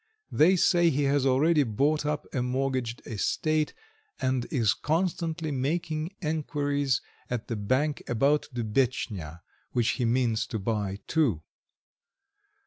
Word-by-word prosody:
They 175 +5 +5
say 175 -1 +4
he 145 -1 +1
has 140 -1 +2
already 150 +5 +4
bought 145 +5 +1
up 150 0 -2
a 130 - 0
mortgaged 130 -1 -1
estate, 155 +8 0 0.4
and 130 -1 0
is 115 -9 +2
constantly 165 -1 -1
making 155 +5 -2
enquiries 145 -3 0 0.3
at 120 -3 -4
the 115 - -1
bank 130 +9 0
about 140 +5 +2
Dubetchnya, 110 - -1 0.3
which 120 -2 +2
he 125 - 0
means 115 -2 +1
to 115 - -3
buy 100 -2 -2
too. 125 - +1
135 Hz, 125 wpm, -28 LUFS, 120-155 Hz, 0.4 s, They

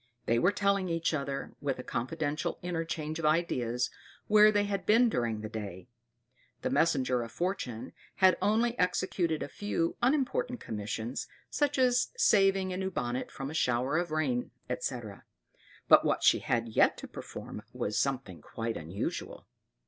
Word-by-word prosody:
They 115 +1 +2
were 180 - +4
telling 200 -2 +1
each 165 0 0
other, 140 -2 -3
with 140 -2 -1
a 125 - -6
confidential 140 +6 -2
interchange 165 -2 -3
of 165 - -2
ideas, 125 -7 +1 0.3
where 210 0 +7
they 205 -1 +2
had 200 -2 -2
been 230 +3 +5
during 115 - -1
the 110 - -4
day. 105 -1 -7 0.7
The 260 - 0
messenger 130 - +2
of 115 -1 -6
Fortune 170 - -3 0.2
had 185 -2 +5
only 230 +3 +2
executed 180 -3 0
a - - -4
few 170 0 -2
unimportant 255 -2 +1
commissions, 110 - -4 0.2
such 290 -1 +1
as 250 -1 +3
saving 195 - +4
a - - -3
new 190 0 -1
bonnet 125 -7 -3
from 135 +1 -6
a - - -7
shower 130 +1 +1
of 175 -1 -2
rain, 140 -6 0 0.2
etc.; 120 -4 -4 0.6
but - - +8
what - - 0
she - - +6
had 115 -1 -1
yet 110 - +3
to - - -8
perform - - -8
was 105 - -3
something 130 -10 -1
quite 115 0 -4
unusual. 85 +5 -5
155 Hz, 155 wpm, -30 LUFS, 120-195 Hz, 0.7 s, but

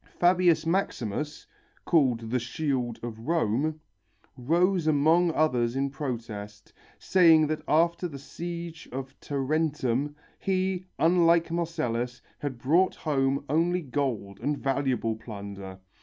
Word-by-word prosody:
Fabius 175 -2 +4
Maximus, 150 - -2 0.4
called 125 -9 +2
the 125 - +2
"shield 125 -2 -2
of 115 -2 -6
Rome," 155 +2 0 0.6
rose 170 +6 +1
among 160 +4 +4
others 125 -7 +1
in 135 0 0
protest, 110 -7 -6 0.2
saying 165 -4 +5
that 155 +1 -2
after 170 +3 +2
the 145 -5 -8
siege 170 +3 -7
of 135 +1 -5
Tarentum, 145 -1 -1 0.2
he, 185 -1 -1
unlike 170 +1 +4
Marcellus, 125 -8 -2 0.2
had 140 -4 -4
brought 165 +10 +2
home 140 -2 0
only 170 +4 +1
gold 125 -8 -3
and 145 0 -1
valuable 135 -5 0
plunder. 100 -3 -8
145 Hz, 110 wpm, -27 LUFS, 125-165 Hz, 0.6 s, saying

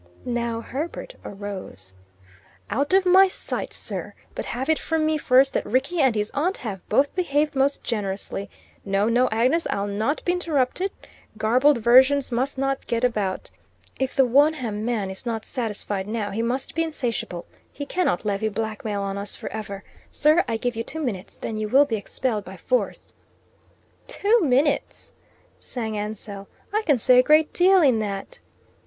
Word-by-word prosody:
Now 235 -2 -2
Herbert 320 - -5
arose. 190 - -7 0.8
"Out 280 - 0
of 380 0 +4
my 380 +2 +7
sight, 370 - -3
sir! - - -5 0.2
But - - -4
have 255 +3 -3
it 315 -1 +2
from 320 -1 0
me 310 0 +1
first 265 0 +4
that - - 0
Rickie 270 +8 0
and 260 -4 +3
his 210 0 -1
aunt 340 +7 0
have 200 -6 -6
both 275 +6 +2
behaved 300 -4 0
most 275 +1 +1
generously. 200 -2 -3 0.3
No, 195 +1 +1
no, 245 +2 +3
Agnes, 255 +9 +2
I'll 200 - -1
not 215 +9 -2
be 355 - +2
interrupted. 340 0 0 0.5
Garbled 250 +6 +4
versions 260 +4 +5
must 260 +4 -1
not 270 0 -1
get 235 0 -1
about. 210 -6 -1 0.5
If 265 0 -1
the 270 -2 +5
Wonham 255 -5 +2
man 220 -5 -1
is 190 +6 -5
not 225 -2 -3
satisfied 210 -5 -3
now, 210 -2 -2
he 215 +3 -2
must 245 +3 -2
be 330 - 0
insatiable. 240 - -3 0.3
He 285 - -6
cannot 285 - 0
levy 205 +1 0
blackmail 215 -1 -3
on 195 0 -3
us 200 0 -2
for - - -7
ever. 200 -2 -6 0.3
Sir, 305 +4 +3
I 225 - -1
give 245 +1 -2
you 230 - -2
two 320 +6 -5
minutes; 200 -9 -4
then 220 - -4
you 215 0 -2
will 275 +5 +6
be 230 - -2
expelled 215 +1 -2
by - - -10
force." - - -2 0.9
"Two 465 -2 +2
minutes!" 285 -1 0 0.5
sang 225 -3 -4
Ansell. 205 -1 -6 0.3
"I 430 - +2
can 290 -4 +4
say 250 +2 +5
a - - +6
great 305 +3 +4
deal 370 0 +5
in 255 -6 +4
that." 200 -2 -5
245 Hz, 170 wpm, -24 LUFS, 210-290 Hz, 0.9 s, my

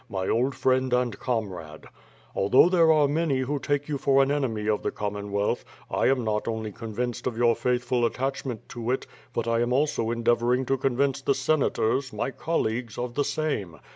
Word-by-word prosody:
My 95 -1 -3
old 130 +4 +1
friend 130 0 +1
and 125 -2 0
comrade: 95 -10 -4 0.5
"Although 125 - +5
there 170 -3 +5
are 150 -2 +4
many 145 -2 0
who 140 +3 -1
take 145 +1 -1
you 145 -2 -2
for 135 0 +4
an 135 - 0
enemy 115 -7 -1
of 105 -1 +1
the - - -1
Commonwealth, 100 0 -2 0.3
I - - +2
am 130 -2 +2
not 105 0 -1
only 110 -1 -3
convinced 115 +3 -4
of 120 -3 -3
your 120 -1 +4
faithful 125 0 0
attachment 130 -1 -2
to 120 -1 -5
it, 130 - 0 0.3
but 115 -2 -2
I 115 0 +2
am 120 +1 0
also 130 -4 +1
endeavoring 120 +2 +1
to 135 +2 +1
convince 135 +1 +1
the 140 0 +1
Senators, 135 -2 +1
my 110 +5 -2
colleagues, 120 -8 -2
of 120 0 -3
the 145 - +1
same. 120 - -2
125 Hz, 185 wpm, -26 LUFS, 110-135 Hz, 0.5 s, Although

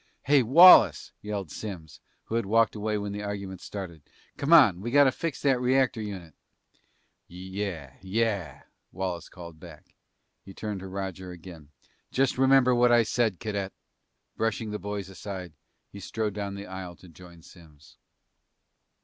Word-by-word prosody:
"Hey, 145 0 +4
Wallace," 165 +10 +7
yelled 100 -6 -5
Simms, 80 -10 -8 0.2
who - - -9
had 115 -3 -1
walked 115 +1 +3
away 105 0 -2
when 100 0 -4
the 105 +1 -5
argument 100 -3 -6
started. 90 -6 -8 0.3
"Come 140 +3 -3
on. 100 - +6
We 115 - -4
gotta 140 +1 +5
fix 165 +3 -5
that 135 -3 +2
reactor 130 -2 +1
unit!" 95 -7 -7 0.9
"Yeah 90 -6 -6
yeah," 100 -2 -2 0.3
Wallace 90 -2 -5
called 85 -3 -12
back. 80 -3 -14 0.5
He 95 - -13
turned 105 -3 -5
to 95 - -8
Roger 95 -1 -6
again. 85 -4 -12 0.4
"Just 130 -1 0
remember 135 -1 +5
what 120 0 +4
I 120 -1 +5
said, 110 -4 -1
cadet!" 100 -3 -4 0.6
Brushing 110 -1 -2
the 105 - -4
boys 100 -1 -5
aside, 95 -2 -8 0.4
he 100 - -10
strode 105 +1 -3
down 100 -1 -5
the 100 0 -8
aisle 95 -2 -8
to 90 - -17
join 85 0 -15
Simms. 75 -6 -18
100 Hz, 150 wpm, -27 LUFS, 90-115 Hz, 0.9 s, Wallace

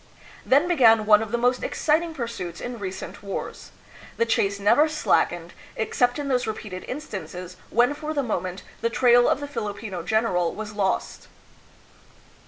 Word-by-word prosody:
Then 285 +6 +4
began 230 -10 +5
one 210 0 +6
of 220 -2 -5
the 240 - +1
most 245 +1 +1
exciting 320 +1 0
pursuits 195 - -5
in 245 -1 -6
re 195 -2 -3
cent 190 0 -8
wars. 200 -1 -6 0.5
The 230 - +2
chase 200 -3 +1
never 235 +10 +4
slackened, 175 - 0 0.2
except 245 +2 +1
in 290 -1 -3
those 250 -3 0
repeated 210 -4 -5
instances 185 - -6
when 245 +5 +3
for 305 +1 -5
the 290 -3 0
moment 185 -5 -3 0.2
the 230 - +1
trail 245 0 +5
of - - +1
the 285 - -5
Filipino 205 -7 -5
general 180 -3 0
was 215 0 -6
lost. 200 -2 -2
225 Hz, 160 wpm, -24 LUFS, 195-255 Hz, 0.5 s, one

